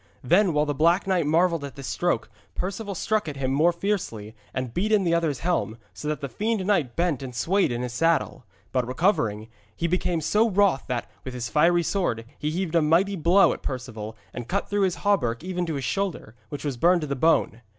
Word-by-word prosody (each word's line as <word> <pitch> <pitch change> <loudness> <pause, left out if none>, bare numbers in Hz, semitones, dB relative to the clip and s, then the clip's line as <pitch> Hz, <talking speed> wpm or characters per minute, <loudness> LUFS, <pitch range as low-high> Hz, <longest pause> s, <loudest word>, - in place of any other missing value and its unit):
Then, 180 +8 +4
while 150 0 +2
the 145 - -1
Black 170 +7 +3
Knight 180 -5 +1
marvelled 165 0 +2
at 140 - -7
this 140 - -8
stroke, 175 +6 -1 0.3
Perceval 200 +2 -4
struck 215 +1 0
at 145 - -7
him 130 -1 -1
more 155 +6 +4
fiercely 170 - -3 0.2
and 130 -3 -4
beat 205 +5 0
in 210 -2 +4
the 170 -2 +1
other's 165 -5 0
helm, 165 -10 -1 0.2
so 150 - -7
that 150 0 -2
the 140 - -3
fiend 210 - -2
knight 160 - +1
bent 170 -6 0
and 130 -2 -7
swayed 190 +5 +1
in 120 +1 -2
his 125 -1 -4
saddle. 165 -1 +1 0.3
But 125 -2 0
recovering, 125 - 0 0.3
he 170 - -3
became 175 0 0
so 215 +8 +2
wroth 200 -7 +2
that, 125 -2 -2 0.2
with 130 -1 -7
his 125 -1 -4
fiery 170 +3 +3
sword, 150 - -1
he 150 - -1
heaved 170 +1 -2
a 170 - +4
mighty 170 +6 +3
blow 180 +3 +4
at - - -9
Perceval, 115 -4 -6 0.2
and 120 -2 -6
cut 200 +7 -1
through 205 -1 +2
his 185 - 0
hauberk 140 - +1
even 180 -1 -2
to 160 - -2
the 140 - -3
shoulder, 190 - -3 0.2
which 145 - -6
was 140 -4 -2
burned 175 +6 +4
to 150 - -3
the 140 - -2
bone. 130 -5 +2
165 Hz, 220 wpm, -25 LUFS, 130-185 Hz, 0.3 s, Then